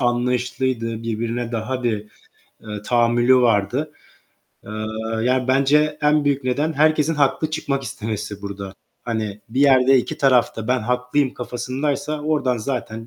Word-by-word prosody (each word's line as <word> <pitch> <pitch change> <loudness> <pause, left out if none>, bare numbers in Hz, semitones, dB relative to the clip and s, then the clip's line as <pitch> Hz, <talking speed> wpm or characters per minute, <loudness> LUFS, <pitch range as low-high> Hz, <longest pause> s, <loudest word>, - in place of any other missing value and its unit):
anlayışlıydı, 120 -1 -1
birbirine 115 +1 -3
daha 125 +3 -3
bir, 105 -3 -1 0.6
eee, 105 -2 -7
tahammülü 120 +2 +3
vardı. 120 +6 +1 0.7
Eee, - - -10 0.5
yani, 125 +1 +1
bence 150 +3 +3
en 150 0 +3
büyük 140 -1 0
neden 145 +5 0
herkesin 155 +1 +2
haklı 150 +2 +1
çıkmak 145 -3 -2
istemesi 105 -3 -5
burada. 100 -1 -6 0.3
Hani, 110 -3 -3
bir 125 +5 -2
yerde 135 -1 +6
iki - - -3
taraf 130 -3 +3
da 110 0 -5
ben 125 0 +2
haklıyım 125 +4 0
kafasındaysa, 140 +5 -3
oradan 145 -5 0
zaten, 115 -2 -4
125 Hz, 135 wpm, -21 LUFS, 115-140 Hz, 0.7 s, yerde